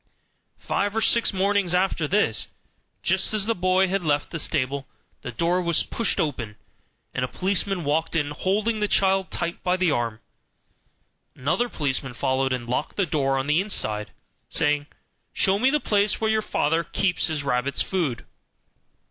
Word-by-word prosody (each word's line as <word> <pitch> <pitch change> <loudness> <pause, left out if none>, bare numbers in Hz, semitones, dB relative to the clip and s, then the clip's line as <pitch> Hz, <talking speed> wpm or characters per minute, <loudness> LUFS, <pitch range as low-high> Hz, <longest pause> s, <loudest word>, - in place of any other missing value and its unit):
Five 205 +1 -1
or 225 - +1
six 235 - +4
mornings 195 -2 +1
after 180 -4 +1
this, 205 +7 +2 0.6
just - - +1
as 210 -2 +2
the 230 - +1
boy 185 0 +2
had 195 +1 0
left 145 -3 0
the 165 - -3
stable, 140 -2 -2 0.3
the 125 - -6
door 170 +9 +1
was 170 -2 +2
pushed 230 -4 0
open, 120 -8 -2 0.6
and 125 - -1
a - - 0
policeman 190 +2 -1
walked 155 +3 0
in, 145 -3 0
holding 210 +8 0
the 210 - +1
child 195 -1 +2
tight 170 0 -3
by 180 0 +1
the 185 -3 +2
arm; 115 -4 -1 1.2
another 195 - 0
policeman 135 - -2
followed, 130 +2 0
and 125 -2 -2
locked 125 +5 -2
the 200 - +1
door 140 -4 0
on 135 - -1
the 150 +4 +3
inside, 105 - 0 0.4
saying, 145 0 +1 0.5
"Show 195 +1 +2
me 255 +4 +4
the 300 +2 +2
place 205 -5 +1
where 220 0 +1
your 220 0 +2
father 165 -4 0
keeps 185 0 +1
his 155 -3 -2
rabbits' 135 0 0
food." 160 - -2
170 Hz, 165 wpm, -24 LUFS, 140-195 Hz, 1.2 s, six